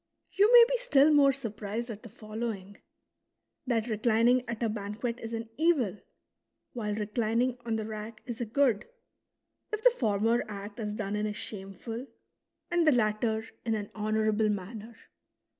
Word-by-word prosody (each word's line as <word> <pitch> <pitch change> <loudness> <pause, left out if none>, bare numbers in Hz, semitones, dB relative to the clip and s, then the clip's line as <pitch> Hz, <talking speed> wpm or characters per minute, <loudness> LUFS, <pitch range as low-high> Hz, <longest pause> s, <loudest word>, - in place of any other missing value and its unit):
You 410 +3 +4
may 480 -1 +10
be - - 0
still 305 - +5
more 280 -2 +6
surprised 230 -2 -5
at 210 -1 -8
the 230 - -11
following, 215 -2 -6 0.4
— - - -49
that 230 -3 +1
reclining 230 +2 +3
at 235 0 -3
a - - +3
banquet 220 +3 -3
is 225 - -6
an 225 0 -4
evil, 275 - +2 0.7
while 210 -4 -2
reclining 230 +3 0
on 225 - +1
the 220 -1 -2
rack 215 0 -7
is 240 -1 -5
a - - 0
good, 240 -2 +2 0.8
if 430 0 -3
the - - +8
former 225 - +1
act 205 +1 -7
is 210 -1 -3
done 210 -1 -3
in 210 0 0
a 210 - -3
shameful, 215 +5 -6 0.6
and" 345 -2 +3
the - - +8
latter 220 -2 +1 0.2
in 225 -2 0
an 205 -1 -5
honourable 215 0 +1
mannei'. 210 +3 -5
225 Hz, 160 wpm, -29 LUFS, 210-245 Hz, 0.8 s, may